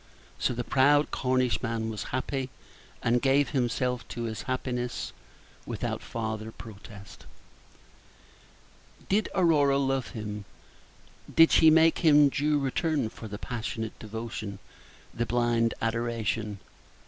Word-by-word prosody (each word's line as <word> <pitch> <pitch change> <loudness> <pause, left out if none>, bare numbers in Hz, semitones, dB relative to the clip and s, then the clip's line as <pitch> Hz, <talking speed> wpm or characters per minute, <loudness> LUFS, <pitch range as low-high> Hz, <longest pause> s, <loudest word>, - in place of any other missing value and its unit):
So 125 - 0
the 120 - -2
proud 145 +4 +3
Cornishman 125 -3 0
was 105 - -5
happy, 130 +1 -2 0.5
and 120 +1 +2
gave 140 +1 +3
himself 125 -1 0
up - - -17
to 120 - -5
his 110 -2 -4
happiness 125 -1 -3 0.5
without - - -3
farther 110 -1 -4
protest. 100 -2 -12 1.8
Did 205 +2 +2
Aurora 150 -6 +4
love 135 -2 0
him? 105 -3 -6 0.9
Did 165 0 +6
she 160 - +7
make 160 +1 +5
him 150 -3 +6
due 150 +2 +1
return 145 -1 0
for 110 - -9
the 105 -1 -6
passionate 110 -1 -5
devotion, 110 -2 -6 0.6
the 120 - -2
blind 120 -1 +1
adoration? 115 -2 -1
120 Hz, 115 wpm, -28 LUFS, 110-140 Hz, 1.8 s, she